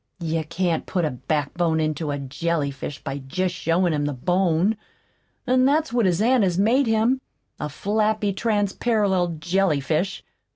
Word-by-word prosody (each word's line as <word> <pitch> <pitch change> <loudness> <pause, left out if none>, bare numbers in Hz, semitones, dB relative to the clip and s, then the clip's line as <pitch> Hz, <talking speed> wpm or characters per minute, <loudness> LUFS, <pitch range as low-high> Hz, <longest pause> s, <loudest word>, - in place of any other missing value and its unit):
"You 165 -1 -1
can't 170 0 -1
put 180 -4 0
a 155 - -1
backbone 155 +5 -1
into 155 0 -1
a 145 - -1
jellyfish 140 0 -3
by 140 - -4
jest 180 +7 -2
showin' 170 +1 +1
him 145 -1 0
the 145 - -1
bone 180 - +1 0.7
an' 255 0 +3
that's 300 +1 +2
what 235 -5 +3
his 180 +3 +1
aunt 245 -1 +4
has 180 -3 +1
made 235 +7 +3
him 225 +4 +2 0.4
a 150 - -3
flappy, 210 +4 0
transparallel 205 -4 0
jellyfish. 170 0 0
175 Hz, 150 wpm, -23 LUFS, 155-210 Hz, 0.7 s, aunt